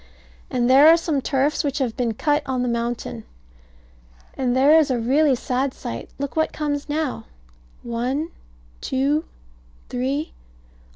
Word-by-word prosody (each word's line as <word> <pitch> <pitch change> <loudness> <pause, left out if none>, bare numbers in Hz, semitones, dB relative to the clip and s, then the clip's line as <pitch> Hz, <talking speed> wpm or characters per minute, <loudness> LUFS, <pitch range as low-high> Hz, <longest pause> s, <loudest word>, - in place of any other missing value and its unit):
And 245 -1 0
there 270 +4 +7
are 330 +1 +8
some 315 -4 -1
turfs 275 +2 0
which 285 -1 -1
have 255 -6 -1
been 235 -4 -1
cut 295 +5 +1
on 255 -2 -1
the - - -1
mountain. 235 - -3 1.1
And 255 -1 0
there 295 +5 +6
is 305 -2 +2
a 255 - +1
really 270 +4 +3
sad 255 +2 -2
sight. 115 - -6
Look 280 0 -4
what 315 0 +1
comes 295 -1 -3
now. 300 -2 -2 0.6
One 250 +7 -2 0.5
two 280 +4 0 0.6
three. 270 +5 -2
270 Hz, 140 wpm, -22 LUFS, 245-295 Hz, 1.1 s, are